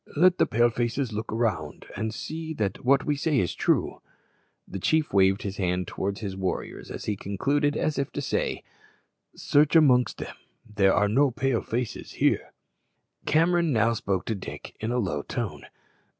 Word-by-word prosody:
Let 180 +3 +5
the - - +4
Pale 120 +2 +3
faces 120 +1 -1
look 110 +1 -3
round 105 -10 -2
and 110 +2 -2
see 160 +6 -5
that 100 -5 -2
what 135 +2 +3
we 150 - +1
say 145 +1 0
is 90 - 0
true." - - 0 0.7
The 95 - -6
chief 155 - +1
waved 95 0 +4
his 100 -1 -4
hand 90 -1 0
towards 100 +2 -3
his 100 -3 -4
warriors 95 -1 -4
as - - -6
he 105 - -1
concluded, 145 +10 0
as 155 - 0
if 140 - -2
to - - -3
say, - - -1 0.7
"Search 150 +2 +3
amongst 125 -7 +5
them. - - -7 0.3
There 100 -2 +3
are 105 - +3
no 135 +7 +3
Pale 125 -1 0
faces 120 0 -4
there." - - +2 0.8
Cameron 170 +1 +3
now 115 -1 +3
spoke 95 -4 -2
to 115 - -1
Dick 100 - -8
in 110 +2 -2
a 125 - 0
low 90 -11 -1
tone. - - -5
115 Hz, 175 wpm, -26 LUFS, 100-145 Hz, 0.8 s, Let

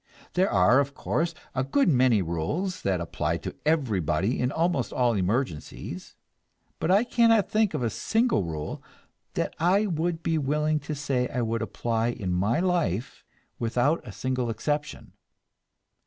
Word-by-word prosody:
There 185 +1 +2
are, 105 +7 +5
of 140 0 -1
course, 165 +1 -1 0.2
a 130 - 0
good 145 - +2
many 125 - +4
rules 90 - -2
that 95 -2 0
apply 85 - -2
to - - -4
everybody 105 - +1
in 125 +1 +1
almost 165 -5 0
all 125 -2 +2
emergencies, 100 - -3 0.6
but - - -1
I 200 +4 +5
cannot 230 -3 +3
think 215 -5 +2
of 135 - -1
a 115 - +1
single 225 - +1
rule 80 -3 -5 0.5
that - - -1
I 185 +6 +3
would 165 -2 -1
be 165 -1 +1
willing 150 +2 +1
to 150 - -1
say 135 -3 0
I 125 -1 -1
would 115 0 -1
apply 115 0 -1
in 100 -6 -2
my 100 - +1
life 165 - -1 0.4
without 125 +7 +1
a 115 - -9
single 125 +4 -2
exception. 145 +7 -3
130 Hz, 155 wpm, -26 LUFS, 110-165 Hz, 0.6 s, are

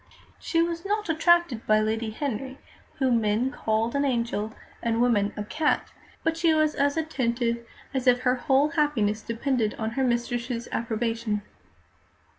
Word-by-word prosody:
She 330 -1 +1
was 335 0 -3
not 415 -1 -1
attracted 325 -6 +3
by 215 0 +5
Lady 220 +1 -1
Henry, 265 +2 -4 0.4
whom 250 -4 +2
men 220 +5 +1
called 220 0 -1
an 280 0 +1
angel, 235 -5 -1 0.3
and 230 -1 0
women 220 -4 +3
"a 210 - -2
cat," 300 +8 0 0.3
but 325 0 +1
she 330 -1 +3
was 310 -1 +3
as 285 +2 +1
attentive 235 -6 -1 0.3
as 265 -1 -2
if 245 0 +5
her 250 -1 +3
whole 270 +3 +2
happiness 250 -10 +1
depended 230 -1 -1
on 220 0 -3
her 265 +3 -1
mistress's 240 -1 -1
approbation. 225 -2 -1
245 Hz, 150 wpm, -26 LUFS, 225-290 Hz, 0.4 s, by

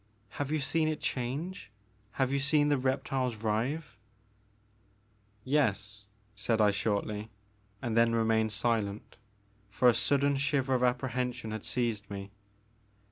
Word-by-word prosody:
Have 145 0 -4
you 155 - +2
seen 155 +2 +1
it 155 -1 -1
change, 140 - -3 0.2
— 105 0 -36
have 130 -1 0
you 140 - +1
seen 145 +1 +3
the 145 - +3
reptiles 130 -3 -1
writhe? 115 +3 -1 0.6
" 105 0 -37
''Yes," 105 -7 0 0.3
said 110 +2 0
I 105 -1 +5
shortly, 105 +1 -2 0.5
and 115 -3 -1
then 115 0 +4
remained 110 -1 +2
silent, 110 -2 -1 0.5
for 115 +5 +2
a 120 - +7
sudden 140 +3 +2
shiver 140 -1 +1
of 125 - +2
apprehension 125 -2 -1
had 110 -1 -5
seized 115 -5 -2
me. 100 0 -6
115 Hz, 135 wpm, -31 LUFS, 105-135 Hz, 0.6 s, a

